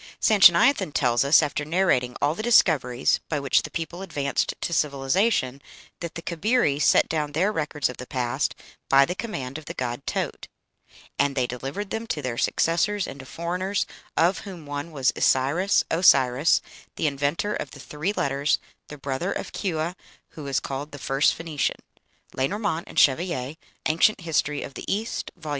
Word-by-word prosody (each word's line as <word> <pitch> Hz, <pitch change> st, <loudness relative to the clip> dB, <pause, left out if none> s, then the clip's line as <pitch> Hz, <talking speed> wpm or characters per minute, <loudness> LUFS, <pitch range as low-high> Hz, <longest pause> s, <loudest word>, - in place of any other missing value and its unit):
Sanchoniathon 190 Hz, -, +5 dB
tells 120 Hz, -2 st, +2 dB
us, 145 Hz, +3 st, +5 dB
after 150 Hz, 0 st, -2 dB
narrating 150 Hz, -7 st, +1 dB
all 145 Hz, +2 st, +2 dB
the 175 Hz, -, -5 dB
discoveries 150 Hz, -, +3 dB
by 150 Hz, -, 0 dB
which 140 Hz, -2 st, +2 dB
the -, -, -7 dB
people 165 Hz, +2 st, -5 dB
advanced 145 Hz, -7 st, -1 dB
to 170 Hz, -, -3 dB
civilization, 140 Hz, -, +1 dB, 0.4 s
that 170 Hz, 0 st, -6 dB
the 170 Hz, -, -6 dB
Cabiri 170 Hz, -, +1 dB
set -, -, +4 dB
down 150 Hz, -2 st, -2 dB
their 185 Hz, +7 st, +2 dB
records 150 Hz, -6 st, -1 dB
of 125 Hz, -, -7 dB
the 130 Hz, -, -8 dB
past 125 Hz, -2 st, -1 dB, 0.3 s
by 135 Hz, 0 st, +6 dB
the 175 Hz, -, -3 dB
command 160 Hz, -, -5 dB
of 155 Hz, -, -15 dB
the -, -, -7 dB
god 125 Hz, +1 st, -4 dB
Taaut, -, -, -3 dB, 0.7 s
"and 140 Hz, -1 st, +2 dB
they 130 Hz, -2 st, +1 dB
delivered 135 Hz, +11 st, -5 dB
them 225 Hz, +1 st, -3 dB
to 150 Hz, -, -2 dB
their 125 Hz, -2 st, -3 dB
successors 190 Hz, +5 st, +1 dB
and 140 Hz, -, -8 dB
to 130 Hz, -, -10 dB
foreigners, 180 Hz, +5 st, -2 dB, 0.3 s
of 175 Hz, +3 st, +3 dB
whom 180 Hz, -6 st, -9 dB
one 145 Hz, +3 st, -5 dB
was 135 Hz, -4 st, +1 dB
Isiris 145 Hz, +10 st, +2 dB
(Osiris), 140 Hz, -4 st, +4 dB, 0.3 s
the -, -, -2 dB
inventor 145 Hz, +8 st, 0 dB
of 140 Hz, -, -4 dB
the 140 Hz, -, -13 dB
three 150 Hz, +7 st, -3 dB
letters, 140 Hz, -6 st, 0 dB, 0.3 s
the 150 Hz, -, -9 dB
brother 140 Hz, +7 st, -3 dB
of -, -, -4 dB
Chua, 170 Hz, -3 st, -2 dB, 0.4 s
who 150 Hz, -3 st, -9 dB
is 135 Hz, -, +1 dB
called 140 Hz, +2 st, -6 dB
the -, -, -6 dB
first 135 Hz, +1 st, +2 dB
Phoenician." 160 Hz, -3 st, -2 dB, 0.6 s
(Lenormant 170 Hz, +4 st, -1 dB
and -, -, -12 dB
Chevallier, 145 Hz, -1 st, +2 dB, 0.3 s
"Ancient 165 Hz, +6 st, +3 dB
History 150 Hz, -3 st, -1 dB
of 140 Hz, -, -8 dB
the -, -, -5 dB
East," 220 Hz, +3 st, -2 dB
vol. 160 Hz, -4 st, -9 dB
150 Hz, 170 wpm, -25 LUFS, 135-180 Hz, 0.7 s, by